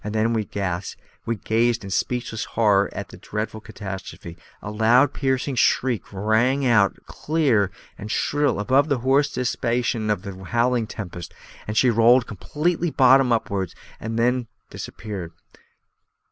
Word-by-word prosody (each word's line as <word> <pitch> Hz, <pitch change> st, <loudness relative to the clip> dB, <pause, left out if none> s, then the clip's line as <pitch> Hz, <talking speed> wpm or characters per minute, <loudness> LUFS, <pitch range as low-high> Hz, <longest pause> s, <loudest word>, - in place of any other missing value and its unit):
Then, 110 Hz, +2 st, 0 dB
as 100 Hz, -4 st, -3 dB, 0.3 s
we 115 Hz, -, 0 dB
gazed 115 Hz, +2 st, 0 dB
in 100 Hz, -, -7 dB
speechless 115 Hz, +2 st, -2 dB
horror 100 Hz, -3 st, +2 dB
at -, -, -6 dB
the -, -, -12 dB
dreadful 110 Hz, +1 st, -5 dB
catastrophe, 95 Hz, -5 st, -8 dB, 0.2 s
a 105 Hz, -, -7 dB
loud, 120 Hz, +6 st, +4 dB
piercing 135 Hz, 0 st, -1 dB
shriek 125 Hz, -1 st, +1 dB
rang 110 Hz, +7 st, +1 dB
out 110 Hz, -5 st, +3 dB
clear 135 Hz, -, +1 dB, 0.3 s
and 105 Hz, -, -7 dB
shrill 145 Hz, +4 st, 0 dB
above 135 Hz, +8 st, +2 dB
the 140 Hz, -, +2 dB
hoarse 135 Hz, +4 st, +2 dB
diapason 120 Hz, -2 st, -1 dB
of 100 Hz, -3 st, -2 dB
the 95 Hz, -2 st, -8 dB
howling 120 Hz, +1 st, +1 dB
tempest. 90 Hz, -5 st, -8 dB, 0.4 s
She 125 Hz, +3 st, +4 dB
rolled 115 Hz, +2 st, +5 dB
completely 160 Hz, -, -2 dB
bottom 130 Hz, -2 st, +5 dB
upwards, 100 Hz, -5 st, -1 dB, 0.2 s
and 115 Hz, +1 st, -4 dB
then 125 Hz, +1 st, +1 dB, 0.2 s
disappeared. 95 Hz, -5 st, -7 dB
115 Hz, 130 wpm, -23 LUFS, 105-125 Hz, 0.4 s, rolled